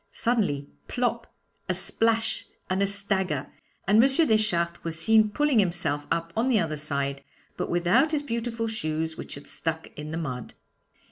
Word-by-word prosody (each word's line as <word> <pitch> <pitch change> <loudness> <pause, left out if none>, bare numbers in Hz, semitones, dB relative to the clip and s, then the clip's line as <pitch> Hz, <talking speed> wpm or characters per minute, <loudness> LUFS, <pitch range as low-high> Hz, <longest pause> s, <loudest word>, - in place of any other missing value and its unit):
Suddenly 195 - 0 0.2
plop, 235 -2 -1 0.4
a - - +3
splash, 225 -1 +1 0.2
and 190 +1 +1
a 200 - +3
stagger! 190 -7 -1 0.4
and 210 +4 +6
M. 270 - +5 0.2
Deschartres 170 -6 +1
was 165 -1 -3
seen 215 +5 +5
pulling 285 +2 +2
himself 170 -6 +1
up 165 0 -1
on 230 +4 +1
the 235 -4 +4
other 160 -4 -1
side, 140 -2 -1 0.3
but - - -3
without 175 - +3
his 300 -2 0
beautiful 230 -2 -2
shoes, 160 -6 -2
which - - -7
had 140 - -11
stuck 160 0 -3
in 150 0 -6
the 160 - -3
mud. 130 -7 -5
190 Hz, 160 wpm, -27 LUFS, 160-225 Hz, 0.4 s, and